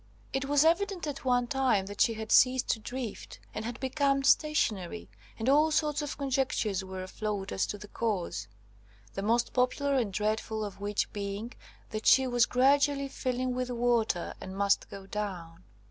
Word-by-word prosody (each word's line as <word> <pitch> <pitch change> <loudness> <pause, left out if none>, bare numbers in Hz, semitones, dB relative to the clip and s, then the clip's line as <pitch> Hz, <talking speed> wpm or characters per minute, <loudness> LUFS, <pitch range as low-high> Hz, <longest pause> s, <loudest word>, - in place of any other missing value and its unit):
It 270 0 -1
was 290 +2 +3
evident 370 +2 +1
at 285 -2 -5
one 245 -1 +3
time 250 -6 +1
that 205 +1 -5
she 230 - +4
had 220 0 -6
ceased 255 0 +5
to 225 - +1
drift, 245 0 -6
and 215 - -4
had 235 +2 -5
become 275 +1 +1
stationary, 200 - +1 0.3
and 225 - -3
all 300 +4 +5
sorts 300 -1 +1
of 295 - -5
conjectures 260 -8 0
were 190 0 -6
afloat 200 0 -4
as 190 - 0
to 205 - -4
the 205 0 -11
cause; 185 - -2 0.7
the 195 - -4
most 235 +4 +1
popular 265 +3 +1
and 240 -7 +1
dreadful 215 +1 -1
of 200 -1 -9
which 205 0 -1
being, 205 +3 -4 0.4
that 215 0 -3
she 265 - +6
was 245 -2 +3
gradually 280 +2 +3
filling 255 -1 -2
with 250 0 -2
water, 235 -6 0
and 190 0 -7
must 200 0 +2
go 195 -1 -9
down. 185 -5 -5
240 Hz, 175 wpm, -30 LUFS, 205-270 Hz, 0.7 s, she